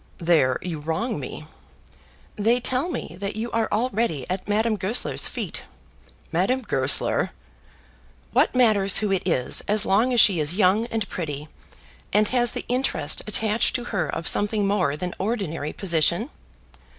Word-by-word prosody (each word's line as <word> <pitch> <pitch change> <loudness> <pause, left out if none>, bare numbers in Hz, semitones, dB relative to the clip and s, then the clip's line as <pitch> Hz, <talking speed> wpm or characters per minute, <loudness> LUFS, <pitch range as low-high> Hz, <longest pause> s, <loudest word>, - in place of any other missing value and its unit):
"There 165 -7 +2
you 170 -4 -4
wrong 160 +7 -2
me." 145 +3 -7 0.9
"They 230 +4 +2
tell 255 +6 -1
me 170 - -5
that 200 +1 -4
you 225 +2 -4
are 225 -1 0
already 215 - -1
at 185 +1 -4
Madame 215 +2 +1
Goesler's 205 +5 0
feet." 220 -9 -5 0.7
"Madame 200 +10 0
Goesler!" 135 - +1 1.0
"What - - +2
matters 210 -6 +4
who 210 -2 +1
it 190 - +1
is 130 -8 0
as 210 0 +2
long 220 +6 +2
as 245 - +3
she 195 -6 +6
is 155 +3 +2
young 205 +3 +3
and 225 -3 -3
pretty, 150 -3 -5 0.6
and 210 +1 +3
has 240 -2 +2
the - - -5
interest 240 - +1
attached 215 +1 +1
to 245 - -2
her 195 - -1
of 165 - -3
something 205 0 +2
more 180 -8 0
than 180 +2 -4
ordinary 185 -8 -3
position? 175 - +1
200 Hz, 150 wpm, -24 LUFS, 165-225 Hz, 1.0 s, she